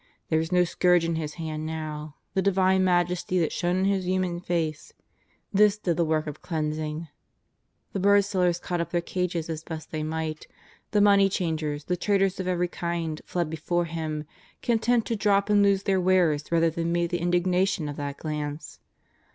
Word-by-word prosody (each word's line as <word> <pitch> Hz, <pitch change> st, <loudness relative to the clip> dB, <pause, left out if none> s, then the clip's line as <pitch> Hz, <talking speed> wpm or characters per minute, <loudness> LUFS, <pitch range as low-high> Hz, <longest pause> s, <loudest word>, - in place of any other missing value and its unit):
There 160 Hz, -, +3 dB
was 160 Hz, +2 st, -3 dB
no 180 Hz, 0 st, +5 dB
scourge 180 Hz, 0 st, +3 dB
in 165 Hz, -, 0 dB
His 155 Hz, -2 st, -3 dB
hand 155 Hz, -2 st, -4 dB
now; 155 Hz, -1 st, -5 dB, 0.2 s
the 190 Hz, -, +2 dB
Divine 190 Hz, -1 st, +3 dB
majesty 180 Hz, 0 st, +1 dB
that 165 Hz, -3 st, +1 dB
shone 175 Hz, 0 st, 0 dB
in 190 Hz, -, +1 dB
His 195 Hz, -2 st, 0 dB
human 185 Hz, -2 st, 0 dB
face 165 Hz, -4 st, -2 dB, 0.3 s
— -, -, -39 dB
this 205 Hz, +1 st, +5 dB
did 180 Hz, -5 st, -1 dB
the 170 Hz, -, +2 dB
work 155 Hz, -1 st, 0 dB
of 150 Hz, -2 st, -7 dB
cleans 155 Hz, -2 st, -2 dB
ing. 155 Hz, +1 st, -4 dB, 0.9 s
The 195 Hz, -, -1 dB
birdsellers 190 Hz, -3 st, +3 dB
caught 175 Hz, -1 st, -2 dB
up 170 Hz, -, -3 dB
their 175 Hz, -, +1 dB
cages 175 Hz, -2 st, -2 dB
as 160 Hz, -1 st, -5 dB
best 160 Hz, -2 st, -7 dB
they 155 Hz, -, -3 dB
might; 155 Hz, 0 st, -3 dB, 0.4 s
the 210 Hz, -, +2 dB
money 200 Hz, -1 st, +5 dB
changers, 155 Hz, -5 st, -2 dB
the 180 Hz, -, -1 dB
traders 195 Hz, 0 st, +1 dB
of 185 Hz, -, -3 dB
every 180 Hz, -1 st, +1 dB
kino^ 170 Hz, -3 st, -3 dB
fled 175 Hz, -2 st, -1 dB
before 170 Hz, +2 st, -1 dB
Him, 160 Hz, -2 st, -4 dB, 0.4 s
content 235 Hz, 0 st, +2 dB
to 230 Hz, -, -1 dB
drop 200 Hz, -1 st, +2 dB
c>id 205 Hz, -1 st, +5 dB
lose 200 Hz, -1 st, +3 dB
their 190 Hz, -2 st, +2 dB
wares 175 Hz, -5 st, +2 dB
rather 165 Hz, -1 st, +3 dB
than 170 Hz, +1 st, -2 dB
meet 170 Hz, 0 st, 0 dB
the 175 Hz, -, 0 dB
indignation 180 Hz, 0 st, +1 dB
i^f 145 Hz, -1 st, -4 dB
that 140 Hz, -1 st, -4 dB
glance. 150 Hz, -1 st, -5 dB
175 Hz, 190 wpm, -26 LUFS, 160-185 Hz, 0.9 s, no